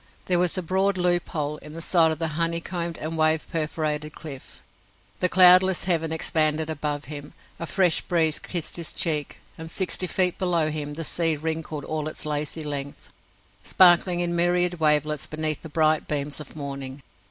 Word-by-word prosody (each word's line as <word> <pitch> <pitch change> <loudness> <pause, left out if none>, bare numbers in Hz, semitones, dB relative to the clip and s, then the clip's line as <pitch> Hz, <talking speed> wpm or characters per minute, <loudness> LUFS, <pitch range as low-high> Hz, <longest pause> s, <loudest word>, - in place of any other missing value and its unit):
There 180 -1 +2
was 180 0 +1
a 185 - -2
broad 190 +3 0
loop 175 -1 0
hole 150 -1 -3
in 150 0 -12
the 165 - -6
side 165 -1 +3
of 160 - -3
the 165 -1 -2
honey 165 +2 -1
combed 170 -1 -4
and 160 +2 -4
wave 155 0 +2
perforated 155 -1 -3
cliff. 140 -5 -10 0.6
The 180 - +1
cloudless 185 0 +6
heaven 165 -3 +1
expanded 160 -1 0
above 150 -1 -3
him; 145 -1 -9 0.2
a 170 - -4
fresh 180 -2 +3
breeze 160 -3 +1
kissed 175 -2 -3
his 170 0 -4
cheek 150 -4 0 0.2
and, 160 0 -7
sixty 185 +1 0
feet 180 0 +1
below 170 -4 +1
him, 150 -1 -5
the 165 +1 -5
sea 165 0 +1
wrinkled 160 -1 -4
all 155 -1 -3
its 155 - -1
lazy 150 +1 -3
length, 145 -1 -6 0.5
sparkling 175 -1 +5
in 175 0 -1
myriad 175 0 +1
wavelets 150 -1 +1
beneath 155 -1 -2
the 160 - -9
bright 155 0 +1
beams 145 0 -2
of 150 - -10
morning. 140 -2 -6
160 Hz, 175 wpm, -24 LUFS, 150-175 Hz, 0.6 s, cloudless